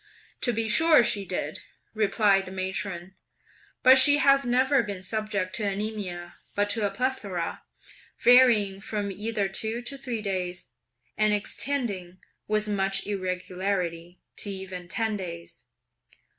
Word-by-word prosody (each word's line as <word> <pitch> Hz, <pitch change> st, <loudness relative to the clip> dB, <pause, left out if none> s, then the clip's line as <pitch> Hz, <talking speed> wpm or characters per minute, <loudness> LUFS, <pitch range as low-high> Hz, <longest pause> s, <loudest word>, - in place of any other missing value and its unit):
"To 245 Hz, -, +2 dB
be 225 Hz, -1 st, -2 dB
sure 310 Hz, +4 st, +6 dB
she 210 Hz, -4 st, +1 dB
did," -, -, -3 dB, 0.3 s
replied 205 Hz, -2 st, +2 dB
the 185 Hz, -, -9 dB
matron; 190 Hz, -1 st, -4 dB, 0.7 s
"but 260 Hz, +1 st, +8 dB
she 285 Hz, +2 st, +7 dB
has 275 Hz, -1 st, +4 dB
never 260 Hz, +2 st, +3 dB
been 200 Hz, -4 st, -6 dB
subject 205 Hz, -2 st, -3 dB
to 215 Hz, -, -2 dB
anaemia, 200 Hz, -4 st, -4 dB, 0.2 s
but 205 Hz, 0 st, +1 dB
to 210 Hz, -1 st, 0 dB
a -, -, -3 dB
plethora, 200 Hz, -9 st, -3 dB, 0.6 s
varying 230 Hz, -6 st, +5 dB
from 205 Hz, -1 st, -3 dB
either 210 Hz, +1 st, -2 dB
two 220 Hz, +5 st, -3 dB
to 275 Hz, +3 st, -6 dB
three 245 Hz, -5 st, -4 dB
days, 180 Hz, -3 st, -3 dB, 0.5 s
and 215 Hz, 0 st, +3 dB
extending, 205 Hz, -5 st, -2 dB, 0.3 s
with 215 Hz, 0 st, 0 dB
much 195 Hz, -2 st, 0 dB
irregularity, 185 Hz, -2 st, -3 dB, 0.2 s
to 205 Hz, -, -4 dB
even 190 Hz, -2 st, -6 dB
ten 220 Hz, +4 st, -1 dB
days." 170 Hz, -8 st, -8 dB
205 Hz, 130 wpm, -26 LUFS, 185-230 Hz, 0.7 s, but